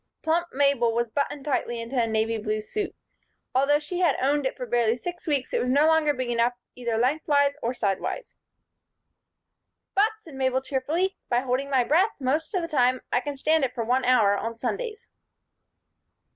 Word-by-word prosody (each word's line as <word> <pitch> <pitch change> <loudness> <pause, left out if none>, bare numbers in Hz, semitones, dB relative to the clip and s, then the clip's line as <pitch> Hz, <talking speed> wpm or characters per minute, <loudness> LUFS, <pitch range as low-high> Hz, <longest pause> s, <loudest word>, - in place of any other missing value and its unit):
Plump 335 +2 +1
Mabel 265 -4 +2
was 235 0 0
buttoned 280 +2 -2
tightly 240 -4 -1
into 230 +3 -6
a 235 -2 +2
navy 220 0 0
blue 215 0 -2
suit. 410 - -4 0.6
Although 275 +3 +4
she 330 +4 -5
had 345 -6 +3
owned 280 +1 +1
it - - -6
for 250 - -4
barely 235 -1 +1
six 350 +6 -7
weeks 280 -4 -1
it - - +1
was 250 - -1
no 285 +4 +4
longer 320 -1 +4
big 255 -3 -3
enough 235 +1 +2 0.2
either 235 -2 -2
lengthwise 285 +3 +2
or 240 +2 -2
sidewise. 205 - -2 1.6
"But," 410 +3 +4
said 320 - -13
Mabel, 260 -1 +1
cheerfully, 295 +8 -1
"by 245 0 +2
holding 265 +2 -1
my 265 -3 +3
breath 355 - +2
most 295 - -1
of 365 - 0
the - - -2
time 255 -4 +2
I - - +3
can 285 +3 -5
stand 310 +2 +2
it 255 -1 -1
for 235 - -1
one 250 +3 +1
hour 225 -6 +4
on 230 +3 -3
Sundays." 470 - -4
265 Hz, 185 wpm, -26 LUFS, 240-305 Hz, 1.6 s, Although